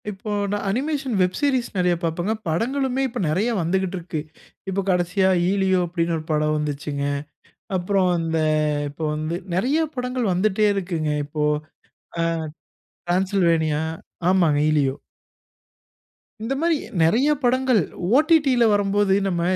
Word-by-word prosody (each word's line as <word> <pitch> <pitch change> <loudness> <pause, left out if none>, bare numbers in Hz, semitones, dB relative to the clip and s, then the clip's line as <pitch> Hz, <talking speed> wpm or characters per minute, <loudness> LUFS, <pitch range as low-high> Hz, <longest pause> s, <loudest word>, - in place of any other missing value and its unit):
இப்போ 210 +1 -7 0.2
நான் 205 0 -2
animation 270 +2 -1
web 180 0 +2
series 265 -5 +1
நெறைய 180 -1 +2
பாப்பேங்க. 175 +5 -1
படங்களுமே 260 - 0
இப்ப 245 -1 -6
நிறைய 190 +10 +1
வந்துக்கிட்ருக்கு. 175 -2 -2 0.5
இப்போ 195 +1 -1
கடைசியா 180 +1 +2 0.2
"ஈலியோ"அப்டின்னு 180 -3 +1
ஒரு 155 - -7
படம் 155 0 +1
வந்துச்சுங்க. 145 -1 -3 0.7
அப்புறம் 185 +1 +1
அந்த 165 -1 -1 0.5
இப்போ 155 +3 -6
வந்து 155 +3 -3 0.2
நிறைய 260 +11 +1 0.2
படங்கள் 250 -3 -1
வந்துட்டே 210 +3 +2
இருக்குங்க 170 -5 -2
இப்போ. 150 +1 -3 0.8
ஆ - - +2 0.8
டிரான்சில்வேனியா, 175 -4 +1 0.5
ஆமாங்க 170 -6 +3
ஈலியோ. 140 -3 +2 1.5
இந்த 230 +5 -2
மாரி 335 -1 +2 0.3
நிறைய 235 - +3
படங்கள் 255 -3 +3 0.3
ஓடிடில 295 -5 +4
வரும்போது 205 -1 +2
நம்ம 175 -3 -1
190 Hz, 115 wpm, -22 LUFS, 165-235 Hz, 1.5 s, ஓடிடில